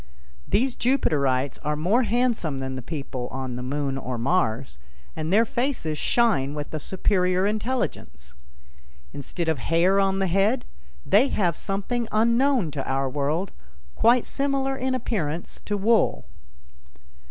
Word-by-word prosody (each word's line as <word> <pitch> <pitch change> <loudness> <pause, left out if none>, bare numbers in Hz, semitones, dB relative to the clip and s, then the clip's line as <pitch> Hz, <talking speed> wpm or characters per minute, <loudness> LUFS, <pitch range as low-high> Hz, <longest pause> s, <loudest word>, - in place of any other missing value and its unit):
These 250 +3 +1
Jupiterites 140 - +1
are 150 +1 0
more 185 +11 +2
handsome 230 - 0
than 130 0 -4
the 130 - -5
people 135 -3 -5
on 130 -1 -5
the 125 - -5
Moon 135 +1 -2
or 125 -2 -4
Mars, 120 - 0 0.4
and 155 +2 -3
their 220 +4 +5
faces 240 - -2
shine 150 - +1
with 150 0 -6
a 155 - -2
superior 185 +2 +1
intelligence. 200 - -3 0.8
Instead 165 +5 -4
of 160 -4 +1
hair 175 +8 +3
on 195 -1 +2
the 195 - +1
head, 195 +7 +1 0.4
they 215 +8 +5
have 175 - 0
something 215 +4 -2
unknown 235 - +2
to 140 -2 -4
our 135 0 0
world, 150 +7 -1 0.4
quite 240 +1 +4
similar 275 -1 0
in 260 0 -1
appearance 175 -10 -3
to 205 - -1
wool. 220 +3 +2
180 Hz, 140 wpm, -25 LUFS, 140-230 Hz, 0.8 s, their